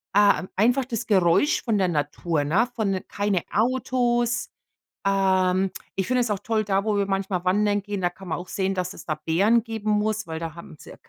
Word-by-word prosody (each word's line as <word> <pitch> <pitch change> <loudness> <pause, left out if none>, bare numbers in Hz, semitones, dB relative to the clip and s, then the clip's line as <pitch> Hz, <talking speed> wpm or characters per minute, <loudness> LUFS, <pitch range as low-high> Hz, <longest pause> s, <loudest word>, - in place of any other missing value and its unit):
äh, 205 0 +5
m 185 - -8
einfach 245 +6 +3
das 235 -4 -4
Geräusch 190 - +3
von 225 -4 +1
der 190 -2 +2
Natur, 150 0 -1
ne, 195 +11 +2
von 195 -4 -1
keine 200 -3 0
Autos. 240 0 +1 0.6
Ähm, 190 -1 +2 0.3
ich 190 - -1
finde 255 0 +2
es 235 -3 -1
auch 200 - -1
toll, 220 +1 0
da, 195 0 0
wo 215 -1 +1
wir 200 -1 +1
manchmal 195 -2 -1
wandern 205 +2 +2
gehen, 205 -1 -4
da 175 - +2
kann 185 +1 -12
man - - -1
auch 180 - -9
sehen, 195 0 -1
dass 180 +1 -2
es - - -11
da 155 - -1
Bären 205 +8 +3
geben 220 -2 -3
muss, 215 0 0
weil 160 -1 -5
da 165 -1 -6
haben 170 -2 -11
es - - -14
ja, - - -11
200 Hz, 215 wpm, -24 LUFS, 185-220 Hz, 0.6 s, äh